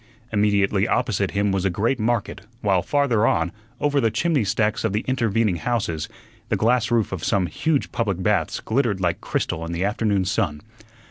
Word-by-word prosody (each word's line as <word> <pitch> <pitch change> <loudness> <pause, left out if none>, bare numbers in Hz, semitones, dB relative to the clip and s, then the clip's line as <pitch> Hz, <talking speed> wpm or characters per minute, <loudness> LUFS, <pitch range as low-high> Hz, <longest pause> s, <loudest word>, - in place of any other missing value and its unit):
Immediately 100 -1 +2
opposite 100 -5 0
him 100 0 0
was 95 -1 0
a 95 - +2
great 115 +8 0
market; 110 -3 -1 0.2
while 95 -4 +2
farther 125 -5 +2
on, 80 +1 +1 0.3
over 145 -1 +1
the 115 - +3
chimney 140 +4 +1
stacks 105 +2 0
of 110 -3 0
the 105 - +1
intervening 115 -7 +1
houses, 100 -9 -2 0.4
the - - +2
glass 120 +1 +2
roof 115 -3 +1
of 95 -4 -5
some 95 -2 +1
huge 145 - -1
public 100 -6 -1
baths - - +1
glittered 115 -4 0
like 85 -2 -1
crystal 80 - -2
in 85 +1 -4
the 85 +3 -1
afternoon 105 -2 0
sun. 75 -5 -1
105 Hz, 180 wpm, -23 LUFS, 95-115 Hz, 0.4 s, the